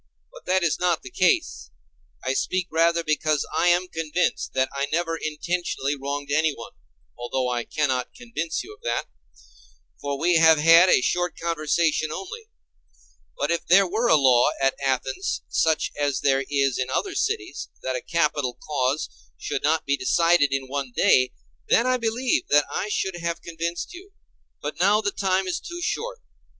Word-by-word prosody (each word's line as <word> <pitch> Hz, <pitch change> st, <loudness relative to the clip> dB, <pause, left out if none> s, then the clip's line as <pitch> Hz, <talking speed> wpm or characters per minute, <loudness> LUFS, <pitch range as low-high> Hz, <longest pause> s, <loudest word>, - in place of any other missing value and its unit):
But -, -, -14 dB
that 185 Hz, 0 st, +2 dB
is 170 Hz, -, +1 dB
not 175 Hz, -2 st, +1 dB
the -, -, -10 dB
case. -, -, +1 dB, 0.6 s
I 130 Hz, -, +1 dB
speak 185 Hz, +6 st, -1 dB
rather 170 Hz, +1 st, +2 dB
because 155 Hz, -1 st, 0 dB
I -, -, +2 dB
am 175 Hz, +1 st, +3 dB
convinced 165 Hz, +1 st, -2 dB
that 130 Hz, 0 st, +2 dB
I 140 Hz, 0 st, -1 dB
never 165 Hz, +1 st, 0 dB
intentionally 155 Hz, -2 st, -2 dB
wronged 140 Hz, +1 st, -5 dB
anyone, 150 Hz, -5 st, 0 dB, 0.5 s
although 125 Hz, +1 st, -2 dB
I 120 Hz, -1 st, -2 dB
cannot 130 Hz, -5 st, -1 dB
convince 230 Hz, -10 st, -4 dB
you -, -, -11 dB
of -, -, -20 dB
that—for 70 Hz, -, -7 dB
we 170 Hz, +3 st, +3 dB
have 160 Hz, -1 st, +6 dB
had 165 Hz, +4 st, +7 dB
a -, -, +5 dB
short 175 Hz, +5 st, -1 dB
conversation 160 Hz, -1 st, 0 dB
only; 430 Hz, -, -7 dB, 0.9 s
but 145 Hz, +3 st, -1 dB
if 170 Hz, -, -2 dB
there 195 Hz, +3 st, +6 dB
were 220 Hz, +6 st, 0 dB
a -, -, +6 dB
law 130 Hz, -4 st, +5 dB
at 135 Hz, 0 st, +2 dB
Athens, 130 Hz, +6 st, -1 dB
such 160 Hz, -1 st, +1 dB
as 145 Hz, -2 st, -1 dB
there 135 Hz, -1 st, +2 dB
is 140 Hz, -3 st, +1 dB
in 130 Hz, 0 st, -2 dB
other 390 Hz, -, -1 dB
cities, 420 Hz, -4 st, -2 dB
that 130 Hz, 0 st, -2 dB
a 125 Hz, -, -3 dB
capital 150 Hz, -7 st, -1 dB
cause 140 Hz, 0 st, -1 dB, 0.3 s
should -, -, -3 dB
not 160 Hz, +2 st, +1 dB
be 140 Hz, -, +1 dB
decided 165 Hz, -1 st, +3 dB
in 135 Hz, -1 st, -1 dB
one 135 Hz, -1 st, -4 dB
day, 130 Hz, 0 st, +4 dB, 0.4 s
then 230 Hz, -, +4 dB
I 255 Hz, 0 st, +2 dB
believe 235 Hz, +2 st, 0 dB
that 145 Hz, 0 st, +4 dB
I 210 Hz, -, -2 dB
should 190 Hz, -3 st, -2 dB
have 170 Hz, 0 st, -4 dB
convinced 170 Hz, -, -4 dB
you; 385 Hz, +3 st, -13 dB, 0.5 s
but 150 Hz, +2 st, -5 dB
now 200 Hz, +4 st, +4 dB
the 205 Hz, -2 st, -1 dB
time 190 Hz, -1 st, 0 dB
is 185 Hz, -, -2 dB
too 345 Hz, 0 st, -8 dB
short. 485 Hz, +7 st, -3 dB
155 Hz, 170 wpm, -24 LUFS, 135-180 Hz, 0.9 s, had